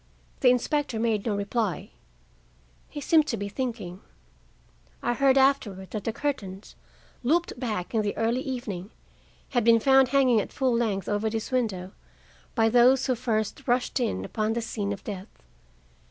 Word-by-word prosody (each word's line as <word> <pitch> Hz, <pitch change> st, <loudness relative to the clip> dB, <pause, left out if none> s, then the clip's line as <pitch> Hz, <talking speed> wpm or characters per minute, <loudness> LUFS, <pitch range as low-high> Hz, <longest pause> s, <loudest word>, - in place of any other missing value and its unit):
The 255 Hz, -, +5 dB
inspector 250 Hz, 0 st, 0 dB
made 225 Hz, -2 st, 0 dB
no 210 Hz, -, +1 dB
reply. 200 Hz, 0 st, -2 dB, 1.0 s
He 295 Hz, -, -7 dB
seemed 310 Hz, +1 st, +3 dB
to 230 Hz, -, -1 dB
be 200 Hz, 0 st, -4 dB
thinking. 210 Hz, -6 st, -4 dB, 1.0 s
I 240 Hz, -, +1 dB
heard 270 Hz, +1 st, +3 dB
afterward 230 Hz, -9 st, +2 dB
that 210 Hz, -3 st, -5 dB
the 225 Hz, -, 0 dB
curtains, 210 Hz, -8 st, -4 dB, 0.5 s
looped 310 Hz, 0 st, 0 dB
back 215 Hz, -7 st, -3 dB
in 220 Hz, -, +2 dB
the 205 Hz, -1 st, -3 dB
early 230 Hz, +3 st, +1 dB
evening, 215 Hz, -8 st, -5 dB, 0.6 s
had 245 Hz, -3 st, +1 dB
been 230 Hz, 0 st, +6 dB
found 265 Hz, +2 st, +5 dB
hanging 255 Hz, -4 st, +4 dB
at -, -, -7 dB
full 260 Hz, -3 st, +1 dB
length 205 Hz, -5 st, -1 dB
over 205 Hz, +1 st, 0 dB
this 220 Hz, +2 st, -4 dB
window 200 Hz, -8 st, -1 dB, 0.6 s
by 225 Hz, -2 st, +4 dB
those 245 Hz, +3 st, +5 dB
who 255 Hz, -, +2 dB
first 225 Hz, -3 st, -2 dB
rushed 245 Hz, +2 st, +1 dB
in 235 Hz, -3 st, -1 dB
upon 215 Hz, -1 st, -1 dB
the 235 Hz, -, -1 dB
scene 205 Hz, -3 st, -3 dB
of 200 Hz, -1 st, -6 dB
death. 195 Hz, -, -8 dB
230 Hz, 160 wpm, -26 LUFS, 205-255 Hz, 1.0 s, been